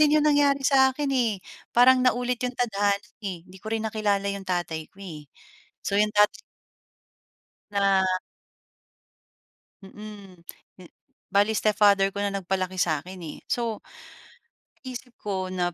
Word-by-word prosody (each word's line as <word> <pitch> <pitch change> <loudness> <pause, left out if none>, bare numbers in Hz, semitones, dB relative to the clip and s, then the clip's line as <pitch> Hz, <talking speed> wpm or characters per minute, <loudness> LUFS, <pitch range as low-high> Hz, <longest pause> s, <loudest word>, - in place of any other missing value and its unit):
din 300 0 +5
'yong 300 - +3
nangyari 285 -2 +3
sa'kin 270 +1 +3
eh, 235 -6 +1 0.4
parang 255 +1 +7
naulit 250 -1 +1
'yong 250 0 -3
tadhana, 205 -4 +1 0.2
eh. 185 -5 -5
'Di 190 0 -15
ko 220 - -8
rin 225 0 -2
nakilala 210 -2 0
'yong 195 -1 -7
tatay 170 -3 -2
ko - - -36
eh. 150 -5 -9 0.5
So 200 - -1
'yong 210 +1 +3
tatay. 210 0 +6 1.4
Na. 195 -1 +3 1.8
Mm, 195 -3 -12 0.3
eh 180 -2 -14 0.4
bale 205 +2 +4
stepfather 205 -2 +3
ko 200 - -3
na 200 - 0
nagpalaki 185 -1 -2
sa'kin, 175 +2 -1
eh. 150 - -7
So 230 -3 -1 1.1
isip 250 -2 -8
ko 190 -2 -3
na 175 -2 -1
205 Hz, 135 wpm, -26 LUFS, 190-245 Hz, 1.8 s, parang